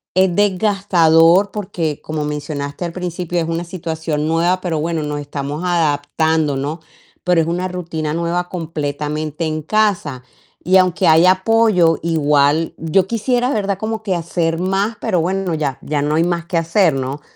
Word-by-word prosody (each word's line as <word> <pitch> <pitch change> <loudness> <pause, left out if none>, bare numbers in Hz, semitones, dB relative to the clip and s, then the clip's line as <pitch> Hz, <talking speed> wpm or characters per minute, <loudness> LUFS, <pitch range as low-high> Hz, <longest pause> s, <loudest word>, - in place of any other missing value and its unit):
es 185 -2 +3
desgastador, 190 -3 +3
porque, 170 -7 -3
como 155 -1 -4
mencionaste 145 +1 -4
al 170 - -4
principio, 180 -1 -3
es 165 - -1
una 165 +1 -2
situación 160 -3 -3
nueva, 170 +3 +1
pero 165 -4 -2
bueno 165 0 -1
nos 150 0 -3
estamos 145 +2 -5
adaptando, 160 -2 +1
¿no? 145 +5 -3 0.4
Pero 180 -2 +3
es 160 - -2
una 180 +2 -1
rutina 165 -4 -4
nueva 170 +2 -1
completamente 155 -1 -3
en 155 0 -2
casa, 175 -10 0 0.4
y 185 +1 +4
aunque 185 0 +2
hay 160 +2 +6
apoyo, 190 -3 +3
igual, 150 -1 +2
yo 175 +4 +1
quisiera, 245 +3 0
¿verdad? 200 -2 -1
Como 220 0 -3
que 200 -3 -1
hacer 165 -1 -1
más, 195 +4 -1
pero 185 -7 +1
bueno, 190 0 -1
ya 145 -4 -2
ya 145 -1 -2
no 150 +1 0
hay 165 - +3
más 170 -1 -1
que 175 -1 -2
hacer, 165 0 +2
¿no? 135 +2 -4
165 Hz, 165 wpm, -18 LUFS, 155-185 Hz, 0.4 s, hay